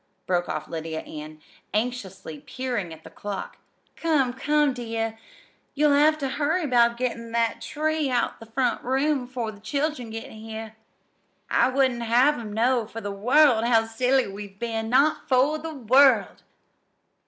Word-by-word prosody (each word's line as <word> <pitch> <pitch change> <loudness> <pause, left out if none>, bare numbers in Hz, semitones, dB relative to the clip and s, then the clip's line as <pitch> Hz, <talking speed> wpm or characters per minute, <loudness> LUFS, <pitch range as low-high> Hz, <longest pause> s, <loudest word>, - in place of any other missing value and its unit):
broke 175 -1 0
off 155 - -3
Lydia 160 -1 -4
Ann, 155 0 -9 0.4
anxiously 210 -9 -3
peering 235 - -4
at 160 0 -11
the - - -11
clock. 205 -1 -6 0.4
"Come, 290 -7 +1
come, 295 +1 +2
dear, 225 -2 -4 0.6
you'll 295 0 +4
have 305 +2 +4
ter 280 -3 -2
hurry 305 +5 0
'bout 235 -3 +3
gettin' 235 -2 -3
that 230 0 0
tree 310 +2 -1
out 245 -2 +1
of - - -24
the 225 0 -13
front 250 0 0
room 270 0 0
'fore 245 -3 -4
the 205 - -15
children 280 +1 -2
get 225 +1 -7
here. 220 0 -8 0.8
I - - +4
wouldn't 260 -2 +1
have 245 +5 +3
'em 220 -3 -7
know 235 +1 +1
for 225 - -7
the 205 -2 -5
world 245 +4 +4
how 230 -1 +3
silly 250 +4 +1
we've 200 0 -9
been 225 0 -3
not 275 +5 +2
for 275 +4 +3
the 320 0 -6
world!" 255 -3 +4
240 Hz, 160 wpm, -25 LUFS, 220-270 Hz, 0.8 s, you'll